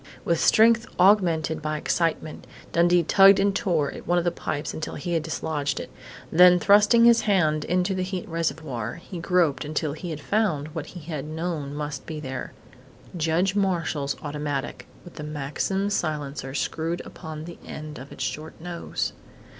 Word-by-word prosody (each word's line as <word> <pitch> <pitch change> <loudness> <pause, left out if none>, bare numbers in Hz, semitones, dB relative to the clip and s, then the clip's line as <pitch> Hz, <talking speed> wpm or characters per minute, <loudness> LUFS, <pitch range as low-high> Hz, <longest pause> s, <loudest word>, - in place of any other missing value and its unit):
With 170 -1 +1
strength 225 +1 +5
augmented 170 -5 +3
by 155 0 -2
excitement, 160 0 -1 0.2
Dundee 175 +1 +4
tugged 195 +4 +7
and 200 0 +2
tore 170 -10 +1
at - - -10
one 175 +1 +2
of 175 - +2
the 175 - +1
pipes 150 -3 -4
until 155 - -5
he 175 -1 -4
had 165 - +1
dislodged 150 -3 -2
it. - - -7 0.4
Then 180 +2 +7
thrusting 210 +5 +5
his 235 -1 +6
hand 155 -7 +2
into 180 +2 +1
the 185 - -2
heat 185 -1 -4
reservoir, 155 -9 -3
he 175 +1 -9
groped 170 -4 +1
until 150 0 -2
he 170 +3 -7
had 155 -2 -5
found 155 -5 0
what 155 -1 -6
he 175 - -10
had 150 -2 -5
known 155 -2 -4
must 150 -2 -5
be 155 -2 -5
there 130 -3 -5 0.6
Judge 170 +4 +1
Marshall's 165 -8 0
automatic, 145 -2 -4 0.2
with 175 - -14
the 150 - -6
Maxim 150 +7 -2
silencer 145 -6 -3
screwed 165 +5 -2
upon 160 -2 -8
the 170 0 -10
end 155 -2 -8
of 135 +2 -11
its - - -5
short 155 +1 -5
nose. 170 0 -4
160 Hz, 170 wpm, -25 LUFS, 150-180 Hz, 0.6 s, tugged